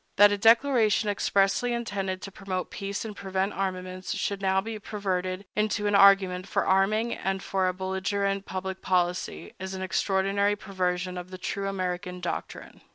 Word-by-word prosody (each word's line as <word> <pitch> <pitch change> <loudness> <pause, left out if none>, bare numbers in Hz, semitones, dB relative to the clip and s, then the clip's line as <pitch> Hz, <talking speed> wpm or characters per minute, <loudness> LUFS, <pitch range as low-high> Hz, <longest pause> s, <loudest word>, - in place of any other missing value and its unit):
That 205 +1 +8
a 205 - +1
declaration 225 -2 +4
expressly 200 +4 +2
intended 195 -5 -3
to 195 - -6
promote 185 -1 -4
peace 200 +2 -4
and 215 -2 -6
prevent 190 +1 -2
armaments 185 -1 -3
should 200 -1 -2
now 190 0 +2
be 220 +2 -5
perverted 190 -2 -3
into 210 0 0
an 205 - +1
argument 195 -2 +5
for - - 0
arming 215 +5 +2
and 195 0 -2
for 190 -1 0
a 185 - 0
belligerent 195 +1 -1
public 190 0 -4
policy 180 -1 -1
is 190 +1 -5
an 190 - -4
extraordinary 195 +2 +1
perversion 180 -2 -2
of 180 0 -9
the 185 - -8
true 195 +2 -3
American 180 -1 -3
doctrine. 180 - -6
195 Hz, 160 wpm, -27 LUFS, 185-205 Hz, -, That